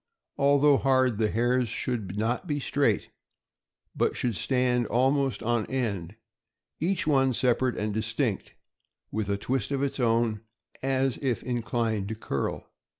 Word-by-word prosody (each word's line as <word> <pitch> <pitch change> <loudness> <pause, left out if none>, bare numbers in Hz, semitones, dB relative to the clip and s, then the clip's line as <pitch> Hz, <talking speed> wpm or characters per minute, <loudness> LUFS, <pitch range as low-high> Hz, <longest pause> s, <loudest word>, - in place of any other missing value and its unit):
Although 140 0 +5
hard, 130 -5 +2
the 110 -1 +2
hairs 120 +2 +1
should 105 -4 -3
not 120 - -1
be 145 -2 -1
straight, 135 -6 0 0.8
but - - +1
should 120 -4 -1
stand 125 +3 +1
almost 135 0 +1
on 120 -1 0
end, 100 -8 -2 0.6
each 175 +1 0
one 135 -4 +3
separate 125 0 +1
and 105 0 -2
distinct, 110 +1 -2 0.6
with 110 -2 -2
a 100 - +1
twist 125 +2 -2
of 140 -1 -1
its 140 0 -2
own, 115 -3 +1 0.4
as 135 -1 0
if 130 -5 -1
inclined 115 -4 -1
to 110 - -3
curl. 70 -10 -3
120 Hz, 140 wpm, -27 LUFS, 110-135 Hz, 0.8 s, Although